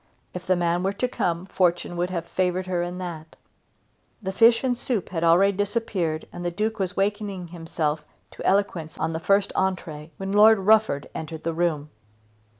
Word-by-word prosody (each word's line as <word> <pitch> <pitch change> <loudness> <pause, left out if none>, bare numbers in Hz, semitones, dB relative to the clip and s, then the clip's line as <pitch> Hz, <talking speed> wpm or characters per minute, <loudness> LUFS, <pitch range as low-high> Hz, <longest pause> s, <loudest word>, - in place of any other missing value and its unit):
If 180 0 -7
the 185 - +4
man 175 0 +1
were 195 +2 0
to 250 +5 -1
come, 175 -7 -2
fortune 175 -2 0
would 175 +1 -1
have 170 -2 -3
favoured 185 +1 -1
her 180 -2 -1
in 175 +1 -4
that. 165 -3 -7 0.8
The 190 -3 -4
fish 230 +4 +5
and 255 -2 +1
soup 235 -5 -2
had 165 -2 -3
already 185 +4 +5
disappeared 200 -6 -1
and 175 - -6
the 175 - 0
Duke 215 +5 -2
was 190 0 -2
wakening 200 -3 -2
himself 165 -2 -2 0.3
to - - -9
eloquence 190 -5 0
on 160 +1 -1
the 160 - -2
first 195 +3 +2
entrée 165 -5 -2
when 195 0 -4
Lord 215 +2 +7
Rufford 205 -7 +3
entered 160 0 -6
the 165 - -1
room. 160 -3 -1
180 Hz, 180 wpm, -25 LUFS, 170-200 Hz, 0.8 s, Lord